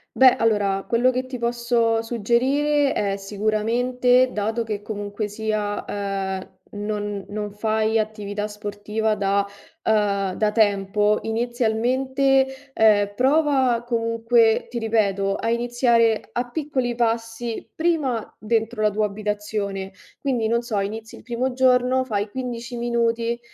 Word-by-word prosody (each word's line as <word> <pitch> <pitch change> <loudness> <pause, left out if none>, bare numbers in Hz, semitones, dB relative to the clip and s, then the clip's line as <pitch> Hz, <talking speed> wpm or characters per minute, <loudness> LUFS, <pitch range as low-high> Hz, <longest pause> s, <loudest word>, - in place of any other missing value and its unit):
Beh, 260 -1 +7
allora, 205 -3 +1
quello 240 +2 +3
che 255 +1 -3
ti 255 -1 -5
posso 235 -1 +1
suggerire 265 +6 +1
è 200 -1 -1
sicuramente, 235 +5 +1
dato 220 +2 -1
che 210 -2 -4
comunque 205 0 -4
sia, 210 -1 -2
ehm, 195 -2 -4 0.2
non 205 -1 -3
non 210 0 -4
fai 220 +1 +1
attività 210 -1 -3
sportiva 210 +1 -2
da 200 0 +1 0.4
uhm, 200 -3 +1
da 210 +2 +1
tempo, 210 -1 +2
inizialmente, 250 +4 +1 0.3
ehm, 205 -3 +4
prova, 265 -2 +2
comunque, 230 -1 +2
ti 240 - -3
ripeto, 200 -3 +1
a 230 - -1
iniziare 235 -1 +2
a 245 0 -2
piccoli 260 -4 -2
passi, 230 0 -2
prima 305 -9 -1
dentro 225 +1 -1
la 215 - +4
tua 210 +1 0
abitazione, 205 -1 -3 0.3
quindi 250 -5 0
non 235 +1 +1
so, 225 -4 -1
inizi 220 +3 -5
il - - -13
primo 250 +3 -2
giorno, 255 0 +3
fai 210 -5 -2
15 245 0 -5
minuti 235 0 0
225 Hz, 125 wpm, -23 LUFS, 210-245 Hz, 0.4 s, Beh